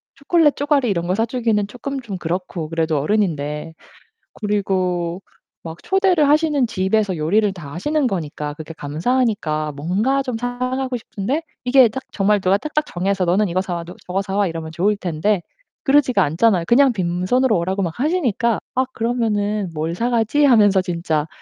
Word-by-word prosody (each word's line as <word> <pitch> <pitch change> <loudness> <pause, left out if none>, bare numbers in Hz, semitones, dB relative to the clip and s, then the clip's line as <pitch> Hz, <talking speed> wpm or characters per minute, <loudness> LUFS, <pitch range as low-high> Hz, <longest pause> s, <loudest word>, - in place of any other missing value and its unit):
초콜릿 300 +1 +2
쪼가리 285 -4 +1
이런 170 -3 -1
거 185 - +1
사 225 +2 +1
주기는 225 -4 0
쪼끔 270 +5 -5
좀 210 -6 -6
그렇고 175 -1 -4
그래도 160 -1 0
어른인데. 155 -3 -1 0.7
그리고 185 -4 -1 0.4
막 165 0 -7
초대를 380 -6 +3
하시는 295 -2 +3
집에서 200 -2 0
요리를 200 +7 +2
다 160 -7 -10
하시는 290 - 0
거니까 150 -7 -4
그게 155 +1 -8
감사하니까 155 - -1
뭔가 200 - 0
좀 255 -3 -3
사 245 +1 -4
가고 255 0 -2
싶은데 235 +8 -3 0.2
이게 255 0 +6
딱 265 +5 -5
정말 205 +1 +2
누가 190 +1 +3
딱딱 305 +6 -2
정해서 190 +1 -1
"너는 190 +4 +2
이거 185 +2 0
사 185 -2 -4
와. 170 - -4
너 175 - -11
저거 185 +2 -1
사 195 0 -4
와." 205 -1 +2
이러면 165 -1 -5
좋을 190 +6 +1
텐데 185 +2 0 0.4
그러지가 270 -7 +3
않잖아요. 175 +4 +2
그냥 265 +1 +5
빈손으로 190 +6 +1
오라고 190 +3 -1
막 170 -3 -2
하시니까 250 - +1 0.2
아 260 +1 +2
그러면은 215 -4 -1
'뭘 160 +2 -2
사 235 +6 -1
가지?' 240 +5 +2
하면서 205 -7 +5
진짜 170 -4 -2
205 Hz, 365 characters per minute, -20 LUFS, 175-250 Hz, 0.7 s, 이게